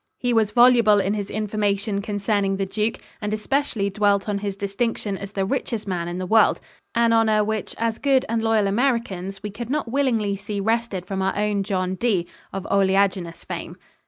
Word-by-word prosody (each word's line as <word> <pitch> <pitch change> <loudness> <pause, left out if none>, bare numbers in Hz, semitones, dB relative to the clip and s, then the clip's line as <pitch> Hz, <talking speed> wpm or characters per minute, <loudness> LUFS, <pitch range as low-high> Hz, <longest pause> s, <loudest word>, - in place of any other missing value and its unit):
He 245 -1 0
was 220 -2 +3
voluble 235 -2 +5
in 200 +1 0
his 205 -2 -3
information 205 -1 -1
concerning 200 -1 0
the 195 - -1
Duke 215 +3 -1 0.2
and 210 0 -2
especially 215 -3 -1
dwelt 200 0 +2
on 205 -1 -1
his 200 -1 -3
distinction 200 +1 -2
as 200 +1 -8
the 195 -1 0
richest 230 -2 -2
man 175 -3 -2
in 175 +1 -4
the 185 - -3
world 220 +4 +4 0.4
an 235 0 +3
honor 220 -2 +4
which 215 0 -3
as 230 -1 -1
good 270 -2 +3
and 225 0 0
loyal 225 -2 +2
Americans 195 -4 -1
we 210 - -4
could 230 +3 -7
not 280 -4 -1
willingly 235 -7 +1
see 205 +1 -5
wrested 220 -3 -1
from 190 +1 -3
our 190 +1 0
own 210 -1 +1
John 185 -2 -1
D. 190 -4 0 0.3
of 195 0 -5
oleaginous 190 -3 +1
fame. - - -6
205 Hz, 190 wpm, -23 LUFS, 195-225 Hz, 0.4 s, voluble